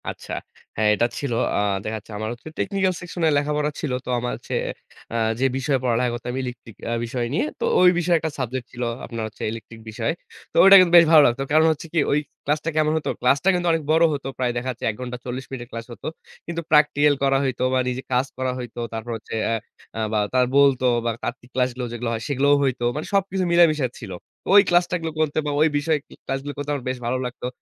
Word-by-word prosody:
আচ্ছা। - - -7 0.4
হ্যাঁ, 110 0 +3
এটা 120 - +2
ছিল 140 -4 -2 0.2
আ - - +2 0.2
দেখা 110 +1 -3
যাচ্ছে 105 - -16
আমার 110 +1 -3
হচ্ছে 120 - -13
technical 195 -2 +1
section 175 0 -7
এ - - +5
লেখাপড়া 150 +1 0
ছিল। 150 - -3
তো - - -7
আমার 125 +1 -2
হচ্ছে - - -8 0.6
আ - - -3 0.2
যে 135 - +2
বিষয়ে 135 0 0
পড়ালেখা 125 0 +1
করতাম 125 +1 -5
electric 120 -3 -8 0.2
আ - - 0
বিষয় 120 +1 -2
নিয়ে। 160 - +1
তো 470 - 0 0.2
ওই 180 - +8
বিষয়ে 175 0 +3
একটা 160 0 -3
subject 130 -1 -3
ছিল 125 0 -5 0.2
আপনার 115 -2 -4 0.3
electric 115 0 -9
বিষয়। 115 +4 -2 0.4
তো - - -28
ওইটা 195 +1 +10
কিন্তু 180 -2 +4
বেশ 170 - +8
ভালো 155 -2 +9
লাগতো। 120 +3 -1
কারণ 155 +1 +5
হচ্ছে 160 +1 -5
কি 170 - +2
ওই 145 - +3 0.3
ক্লাসটা 150 +2 0
কেমন 155 0 +3
হতো? 155 - -3
ক্লাসটা 135 +8 +3
কিন্তু 175 -1 0
অনেক 165 -1 0
বড় 160 +1 +4
হতো। 140 -2 -4
প্রায় 125 -1 0
দেখা 125 +2 -3
যাচ্ছে 125 - -7
১ - - -12
ঘন্টা 125 -1 -5
৪০ 130 +1 -5
মিনিটের 120 -2 -7
ক্লাস 115 0 -6
হতো। - - -8 0.4
কিন্তু 170 0 -4
practical 150 -1 +5
করা 135 0 +3
হইতো 130 -2 -1
বা 130 - +3
নিজে 125 +1 -2
কাজ 125 +2 +3
করা 130 0 -1
হইতো। 120 -1 -7
তারপর 115 +1 -5
হচ্ছে 110 - -8
অ্যা 115 - +1 0.4
আ - - -2
বা 110 - +2
তার 130 -1 +4
বলতো 140 -2 +4 0.2
বা 120 - +2
তাত্বিক 120 0 -5
ক্লাসগুলো 125 -1 0
যেগুলো 120 0 -3
হয়, 110 - -3
সেগুলোও 140 +1 +3
হইতো। 130 -3 -1
মানে 150 - -3
সবকিছু 195 -1 +1
মিলায় 170 0 +7
মিশায় 140 -5 -1
ছিল। 110 -6 -8 0.4
ওই 200 - +10
ক্লাসগুলো 175 -2 +1
করতে 155 -1 0
বা 145 - -1
ওই 155 - +6
বিষয় 155 +2 +1
কা - - -15
ক্লাসগুলো 135 +2 -3
করতে 145 0 -5
আমার 140 -4 -4
বেশ 130 - -2
ভালো 130 +2 0
লাগতো। 125 0 -6
135 Hz, 225 wpm, -23 LUFS, 120-155 Hz, 0.6 s, ওইটা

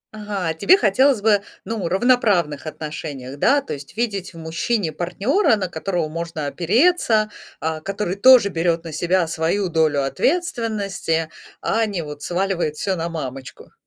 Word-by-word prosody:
Ага, 200 -6 -3
тебе 350 - +5
хотелось 265 - +3
бы, 210 -2 +4 0.2
ну, 220 -6 -3
равноправных 190 - +2
отношениях, 145 -4 -6
да? 285 +1 +4
То - - -6
есть 140 +7 -10
видеть 200 -7 -2
в - - -10
мужчине 165 +3 -1
партнёра, 220 - +1
на 190 -3 -3
которого 175 -1 -2
можно 165 -1 -5
опереться, 215 - +2 0.3
а, 160 0 -3
который 200 0 -3
тоже 245 -1 +7
берёт 165 -1 0
на 165 - -7
себя 175 +2 +1
свою 170 +4 0
долю 155 -4 +2
ответственности, 205 - -1 0.3
а 225 0 +1
не 190 -5 -3
вот 150 -1 -8
сваливает 175 -3 -1
всё 190 +4 -1
на 170 0 -3
мамочку? 135 -5 -7
180 Hz, 145 wpm, -21 LUFS, 160-215 Hz, 0.3 s, тоже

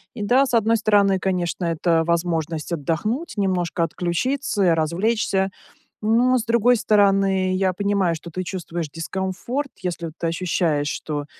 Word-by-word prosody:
И 215 - -6
да, 250 +6 +4
с 250 - -5
одной 225 0 +3
стороны, 205 -2 +3
конечно, 180 -1 -2
это 165 0 +1
возможность 165 -1 -1
отдохнуть, 170 - -2
немножко 180 -3 0
отключиться, 195 - -1
и - - +5
развлечься. 190 +5 +1 0.5
Но, 240 +4 +3
с 230 - -3
другой 235 +1 +4
стороны, 195 -3 +2
я 185 -1 +1
понимаю, 200 -2 +1
что 165 +2 -9
ты 185 +3 -4
чувствуешь 175 -3 -5
дискомфорт, 190 - -4
если 170 -2 -3
ты 170 - -1
ощущаешь, 165 -3 0
что, 145 -1 -4
185 Hz, 140 wpm, -22 LUFS, 170-210 Hz, 0.5 s, и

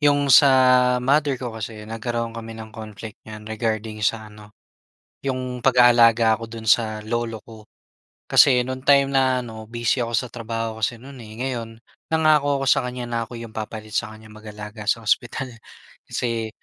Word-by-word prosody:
'yong 145 -2 +3
sa 140 +4 +8 0.6
mother 140 0 +2
ko 125 -2 -6
kasi 110 -1 -7
nagkaroon 115 +1 -4
kami 115 -1 -8
ng 110 -1 -10
conflict 110 0 -10
niyan 110 0 -9
regarding 110 0 -3
sa 110 0 -1
ano, 105 0 -16 0.7
'yong 130 -2 -3
pag-aalaga 120 -3 +5
ko 115 - -5
do'n 115 0 -9
sa 110 0 +2
lolo 115 0 -3
ko. 110 -2 -13 0.6
Kasi 125 -2 +6
noon 130 +1 -5
time 140 -1 +6
na 130 -1 +2
ano, 110 -1 -9
busy 120 +2 -1
ako 115 0 -2
sa 125 +2 -1
trabaho 115 -1 -4
kasi 110 +3 -1
no'n, 135 +1 -12
eh. 110 -2 -11
Ngayon, 115 -3 -4 0.4
nangako 150 -3 +3
ako - - -5
sa - - +4
kanya 125 0 -5
na 120 - -2
ako 120 - -9
'yong 115 -1 -9
papalit 110 0 -6
sa 110 -1 -1
kanya 110 0 -15
mag-alaga 105 0 -9
sa 115 +1 +1
ospital. 120 +4 0 0.6
Kasi 115 -2 -2
115 Hz, 170 wpm, -22 LUFS, 110-125 Hz, 0.7 s, sa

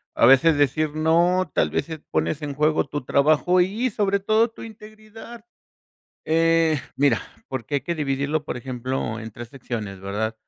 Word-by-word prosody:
a - - +4
veces 140 +5 +6
decir 145 +2 +1
no, 170 +4 +2
tal - - +2
vez, - - -2
eh, 160 -1 -6
pones 155 - -1
en 145 -2 -5
juego 155 +1 +2
tu 145 -1 -5
trabajo 155 +7 +3
y 220 +8 0
sobre 200 -1 0
todo 215 +4 +2
tu 225 - -12
integridad. 215 +1 -12 0.8
Eh, 165 -1 +2 0.2
mira, 135 -7 +3 0.3
porque 130 +1 -5
hay 140 - +2
que 170 +5 -3
dividirlo, 145 0 -2
por - - -4
ejemplo, 125 -2 -4
en 110 -1 -8
3 120 +2 -9
secciones, 115 -7 -6
¿verdad?, 105 +3 -3
155 Hz, 165 wpm, -23 LUFS, 130-180 Hz, 0.8 s, veces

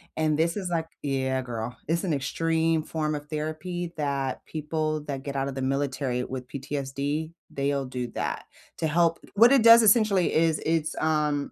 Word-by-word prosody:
And 155 -1 +1
this 165 +4 +1
is, 190 -3 -3
like 165 -2 -1 0.2
yeah, 130 -2 0
girl, 120 -1 -5
it's 165 +2 0
an 180 -5 0
extreme 165 +3 +1
form 155 -1 -2
of 145 0 -7
therapy 165 +3 -4
that 140 -3 -2
people 155 0 -2
that 135 -2 -5
get 140 -1 -5
out 135 0 0
of 140 - -4
the 135 - -3
military 130 -2 -1
with 130 0 -6
PTSD, 140 +3 -3 0.2
they'll 140 0 -1
do 125 -1 -4
that, - - -3 0.3
to 160 - 0
help 165 +1 +2 0.2
what 230 +4 +7
it 270 -4 +5
does, 230 0 +9
essentially 210 -4 +4
is 160 -1 +2
it's, 160 -1 0
um, 150 -2 0
150 Hz, 175 wpm, -26 LUFS, 135-165 Hz, 0.3 s, does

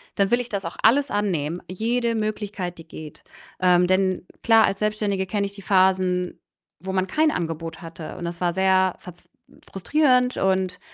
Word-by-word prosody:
dann 200 0 +1
will 240 - +4
ich 245 - -8
das 200 -3 -4
auch 165 - -6
alles 275 +5 +4
annehmen, 175 -6 -1
jede 230 +5 -1
Möglichkeit, 210 -5 -3
die 165 - -13
geht. 155 -2 -11 0.4
Ähm, 180 -1 +4
denn 185 0 +1 0.2
klar, 225 -1 +6
als 195 - -2
Selbstständige 210 -2 -1
kenne 200 +1 -1
ich 200 - -6
die 200 - -11
Phasen, 185 -2 +1 0.4
wo 190 +1 -5
man 190 0 0
kein 310 - +2
Angebot 165 +1 -4
hatte 165 +1 -9
und 175 - -6
das 170 +1 -6
war 175 - +2
sehr 190 0 +2
verz 180 -1 -13 0.4
frustrierend 250 +4 +2
und 190 -1 0
190 Hz, 175 wpm, -23 LUFS, 180-215 Hz, 0.4 s, klar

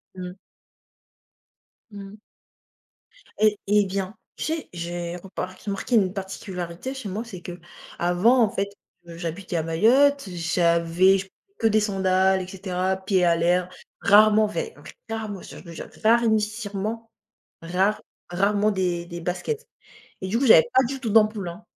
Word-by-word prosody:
Mmh. 180 -1 -6 1.6
Mmh. 200 0 -9 1.2
Et 215 -1 +3
et 205 0 +4
bien, 195 +1 -4 0.2
tu - - -4
sais 320 0 -3
j'ai 175 0 -5
repart 185 0 -7
remarqué 200 +4 -3
une 190 -3 +3
particularité 190 +3 -6
chez 255 -7 -6
moi, 210 +4 -3
c'est 185 -7 -10
qu'avant, 175 +6 0
en 215 - +4
fait, 200 -3 -2 0.4
heu, 165 - -9
j'habitais 175 +1 -4
à 160 - 0
Mayotte, 240 - +3
j'avais 170 +2 +3
j 190 0 -7 0.3
que 225 - +1
des 215 0 +4
sandales 190 -2 +2
et - - -7
cetera, 185 0 -2
pieds 190 -1 +1
à 170 -1 +4
l'air, 175 +2 +1 0.3
rarement, 215 +1 +6
vai 450 - -4 0.3
vraiment 215 -3 -5
ça - - -11
je - - -13
le 170 - -10
jure - - -8 0.2
rarinissirement, 220 -1 +1 0.5
rare 185 +5 0 0.3
rarement 205 +3 +2
des 180 -3 -1
des 170 0 -7
baskets 425 - -3 0.6
et 190 - -3
du 230 +4 0
coup, 270 - +1
j'avais 220 -2 +7
pas 260 0 +5
du 270 +2 -4
tout 230 -5 -3
d'ampoules, 215 -3 +3
hein. 175 +6 -9
195 Hz, 150 wpm, -24 LUFS, 180-215 Hz, 1.6 s, j'avais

